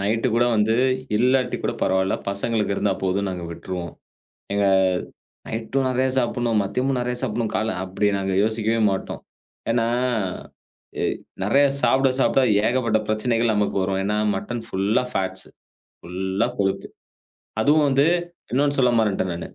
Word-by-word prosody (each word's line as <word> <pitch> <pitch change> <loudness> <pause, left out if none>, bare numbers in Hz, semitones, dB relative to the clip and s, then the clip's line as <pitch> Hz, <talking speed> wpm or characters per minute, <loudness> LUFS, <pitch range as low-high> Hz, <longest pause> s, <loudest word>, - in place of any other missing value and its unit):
Night 115 +5 0
கூட 120 +1 +3
வந்து 110 +1 +2 0.4
இல்லாட்டி 125 +2 +2
கூட - - -1
பரவாயில்ல! 95 0 +1
பசங்களுக்கு 105 +1 -1
இருந்தா 100 - +1
போதும் 95 +1 0
நாங்க 90 -2 -5
விட்ருவோம். 85 -1 -6 0.6
எங்க 100 0 +2 0.8
நைட்டும் 125 +4 -1
நெறையா 130 +1 +1
சாப்பிடணும். 120 -2 0
மதியமும் 125 +6 -1
நெறையா 125 0 -2
சாப்பிடணும். 110 +1 -1
காலை 110 +1 0
அப்படி 95 +2 -1
நாங்க 95 0 -2
யோசிக்கவே 110 +1 0
மாட்டோம். 95 - -4 0.5
ஏன்னா 115 -1 +1 1.1
எ - - 0 0.4
நெறைய 135 +8 +4 0.2
சாப்பிட 130 +2 +3
சாப்பிட 135 - +3 0.3
ஏகப்பட்ட 115 -3 +1
பிரச்சனைகள் 115 +1 +1
நமக்கு 105 -1 0
வரும். 95 0 -1
ஏன்னா 105 +2 0 0.2
மட்டன் 115 +4 -4
ஃபுல்லா 100 +5 +1
ஃபேட்ஸு, 95 0 -3 0.5
ஃபுல் 90 +2 -8 0.2
லா 120 - +3
கொழுப்பு 95 0 -1 0.7
அதுவும் 145 +5 +4
வந்து 140 +2 +3 0.5
இன்னொன்னு 145 +2 +2
சொல்ல 125 -2 +4
மறந்துட்டேன் 95 -4 0
நான். - - -17
110 Hz, 140 wpm, -23 LUFS, 100-125 Hz, 1.1 s, நெறைய